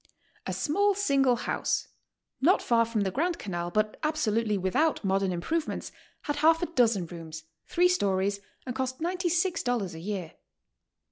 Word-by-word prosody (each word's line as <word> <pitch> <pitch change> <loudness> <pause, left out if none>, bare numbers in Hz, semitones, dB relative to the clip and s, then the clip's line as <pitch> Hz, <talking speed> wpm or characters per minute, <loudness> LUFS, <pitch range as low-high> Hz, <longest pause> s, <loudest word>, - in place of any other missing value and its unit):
A - - -1
small 405 +6 +2
single 275 -10 +3
house, 235 - -1 0.5
not 350 +8 +4
far 230 -1 +3
from 225 -2 -1
the 195 -1 0
Grand 335 - 0
Canal, 175 - -4
but 215 +3 0
absolutely 230 -9 +1
without 195 - +1
modern 195 -1 +1
improvements, 310 - -2 0.3
had 290 0 -2
half 325 +3 +4
a 335 - -4
dozen 225 - +3
rooms, 160 -2 -8 0.2
three 355 +1 +4
stories, 200 - +1 0.3
and 250 -1 -4
cost 260 0 -2
$96 335 - 0
a 160 - -8
year. 185 -2 -4
245 Hz, 145 wpm, -28 LUFS, 195-325 Hz, 0.5 s, not